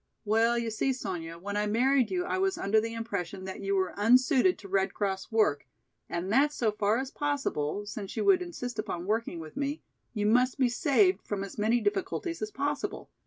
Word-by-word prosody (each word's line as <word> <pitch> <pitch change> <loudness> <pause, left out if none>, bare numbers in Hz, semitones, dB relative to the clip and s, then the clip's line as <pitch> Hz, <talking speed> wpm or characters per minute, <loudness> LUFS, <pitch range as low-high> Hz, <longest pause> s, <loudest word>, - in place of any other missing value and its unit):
"Well, 225 +3 +3
you 230 -1 -1
see, 265 +5 0
Sonya, 175 -8 -5
when 200 +4 -5
I 210 0 +1
married 255 +4 +3
you 360 -1 -1
I 375 - -1
was 385 0 +1
under 215 +2 +2
the 225 +1 -4
impression 200 -4 -4
that 190 - -6
you 195 0 0
were 190 -1 0
unsuited 255 - +4
to 200 - -11
Red 195 0 0
Cross 195 -1 -2
work 210 - +2 0.4
and 175 +3 -3
that 285 +4 +4
so 230 -7 0
far 210 +1 +1
as 265 +1 -3
possible, 240 - -2
since 205 -1 -7
you - - 0
would 385 -2 +5
insist 250 -10 -5
upon 185 -5 -3
working 215 -3 -1
with 155 -1 -9
me, 285 +2 -3 0.3
you 205 -1 0
must 250 +5 +3
be 255 -3 +3
saved 225 - +3
from 200 -2 -4
as 195 +1 -8
many 225 +3 +3
difficulties 210 - -2
as 425 - -2
possible. 290 +1 -3
220 Hz, 205 wpm, -29 LUFS, 200-270 Hz, 0.4 s, would